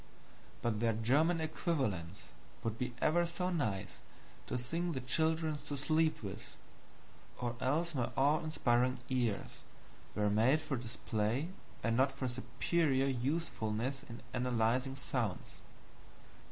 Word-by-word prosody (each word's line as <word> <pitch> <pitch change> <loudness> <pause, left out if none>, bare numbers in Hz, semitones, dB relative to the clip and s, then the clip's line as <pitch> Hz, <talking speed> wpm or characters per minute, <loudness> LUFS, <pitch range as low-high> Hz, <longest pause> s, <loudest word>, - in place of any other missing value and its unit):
But 115 -3 +1
their 115 0 +3
German 145 +10 +3
equivalents 140 - -1 0.4
would 115 -1 -1
be 125 +1 -3
ever 175 +3 +4
so 180 +2 -1
nice 105 - -1 0.5
to - - -1
sing 165 +8 -2
the 130 - -2
children 160 +4 +1
to 145 - -2
sleep 155 0 +2
with, 100 0 -7 0.8
or 120 -1 -2
else 160 +6 +1
my 125 -4 0
awe 145 +3 +4
inspiring 125 -4 +2
ears 120 -5 -1 0.6
were 105 -1 +2
made 115 +9 +4
for 150 -3 -2
display 115 +3 -1 0.3
and 115 0 +2
not 135 +3 +4
for 135 -1 -3
superior 130 +3 +1
usefulness 130 -2 -1
in 115 0 -10
analyzing 125 +1 +1
sounds. 125 -6 -3
130 Hz, 125 wpm, -35 LUFS, 115-155 Hz, 0.8 s, ever